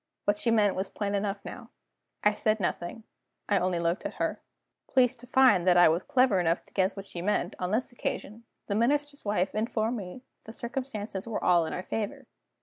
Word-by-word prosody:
What 205 - +3
she 235 - +1
meant 210 -3 +3
was 190 +1 -2
plain 205 -1 -3
enough 200 0 -2
now. - - -8 0.5
I 210 - +5
said 215 +1 +1
nothing: 175 +3 -3 0.4
I 200 -2 +3
only 180 0 0
looked 170 +2 0
at - - -5
her. - - -2 0.5
Pleased 255 -1 +3
to 245 - -9
find 255 -8 +5
that 180 -1 +6
I 175 - +8
was 165 +3 +1
clever 255 -5 +3
enough 170 -1 +1
to - - -26
guess 190 0 +1
what 195 -1 -7
she 175 -3 -7
meant, 205 +4 0
on 180 - -1
this 230 +7 -1
occasion, 230 -1 -5 0.2
the 200 - -2
Minister's 285 +6 0
wife 200 -2 0
informed 225 +1 -1
me 200 +5 -8
that - - -47
the 220 - -9
circumstances 235 -6 -5
were 225 - -3
all 175 -2 +4
in - - -4
our 180 - -4
favor. 210 +1 -4
210 Hz, 210 wpm, -28 LUFS, 185-235 Hz, 0.5 s, I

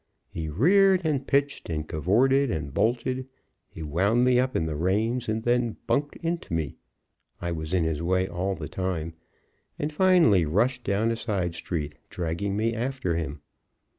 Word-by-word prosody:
He 80 -2 -4
reared, 185 - +4
and 140 -4 0
pitched, 140 -5 0
and 75 -1 -3
cavorted, 125 - +2
and 70 -6 -3
bolted; 120 +6 0 0.4
he 80 - -8
wound 100 +11 +2
me 125 -1 +4
up 130 +1 0
in 80 - +1
the 80 -1 -3
reins, 110 +9 0
and 110 0 -1
then 120 -1 +1
bunked 145 +1 0
into 165 - -2
me 80 -4 -3 0.6
I 85 0 -3
was 80 -2 -4
in 90 -2 +2
his 80 -1 -1
way 95 +2 +1
all 95 +3 -2
the - - -6
time 85 -4 -3 0.6
and 150 +1 -3
finally 170 - +5
rushed 120 - +1
down 105 +4 +1
a - - 0
side 100 -7 -2
street, 75 -4 -4 0.2
dragging 90 +4 -2
me 115 +2 +1
after 120 -6 -2
him. 75 -3 -4
100 Hz, 165 wpm, -26 LUFS, 85-130 Hz, 0.6 s, finally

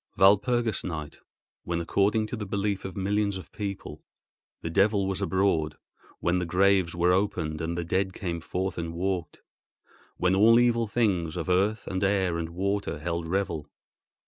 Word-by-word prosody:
Walpurgis 110 +4 +3
Night, 80 -4 -5 0.4
when, 85 0 -2
according 100 +5 +1
to 110 - -5
the 105 -3 -5
belief 100 0 -1
of 95 0 -6
millions 100 +1 0
of 95 - -11
people, 100 -2 -6 0.6
the 80 - -2
devil 100 +2 +3
was 95 0 -2
abroad—when 85 -1 -1
the 90 - -1
graves 95 -1 +3
were 90 +1 +3
opened 85 -5 0
and 85 +1 -2
the 85 - -1
dead 95 +3 0
came 85 -3 -4
forth 90 +2 -3
and 85 0 -4
walked. 90 -2 -3 0.8
When 90 0 +2
all 110 +4 +6
evil 115 -1 +3
things 95 -8 0
of 85 +1 -3
earth 100 +5 +1
and 95 0 -2
air 95 -4 +1
and 80 -1 -3
water 100 +1 -2
held 85 +2 -3
revel. 85 -5 -2
95 Hz, 160 wpm, -27 LUFS, 85-100 Hz, 0.8 s, all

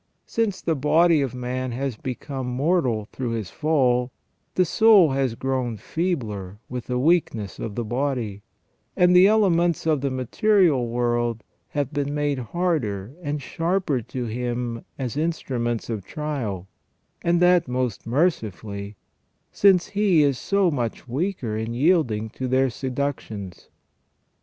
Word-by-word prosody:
Since 220 -5 -1
the 165 - 0
body 155 +3 +4
of 130 -3 -2
man 125 0 -3
has 135 0 -2
become 130 +1 -5
mortal 125 - +1
through 125 -3 -3
his 110 -6 -4
fall, 130 -5 +1 0.4
the 185 - +4
soul 200 -3 +6
has 135 -3 0
grown 130 -2 -2
feebler 110 - -3
with 125 -2 -6
the 125 - -1
weakness 125 - +1
of 110 -3 -5
the 120 - -2
body, 120 -4 -2 0.6
and 180 -1 +5
the 180 +2 +8
elements 175 -7 +3
of 155 -4 +2
the 140 - 0
material 135 - +2
world 120 -1 0 0.2
have 145 0 -3
been 145 0 -1
made 145 -2 0
harder 125 - -2
and 145 -3 -3
sharper 165 -4 0
to 125 +3 -5
him 120 0 -3
as 130 -1 -4
instruments 125 -8 -2
of 110 -4 -4
trial, 120 - -4 0.5
and 170 0 +2
that 180 -2 +4
most 125 -4 -2
mercifully, 105 - -1 0.6
since 190 -3 +4
he 200 -6 +3
is 140 -2 +2
so 195 -3 +2
much 120 -3 -3
weaker 135 - -2
in 110 +2 -3
yielding 125 -8 +2
to 130 - -4
their 130 0 +2
seductions. 125 -8 -4
130 Hz, 140 wpm, -24 LUFS, 120-165 Hz, 0.6 s, the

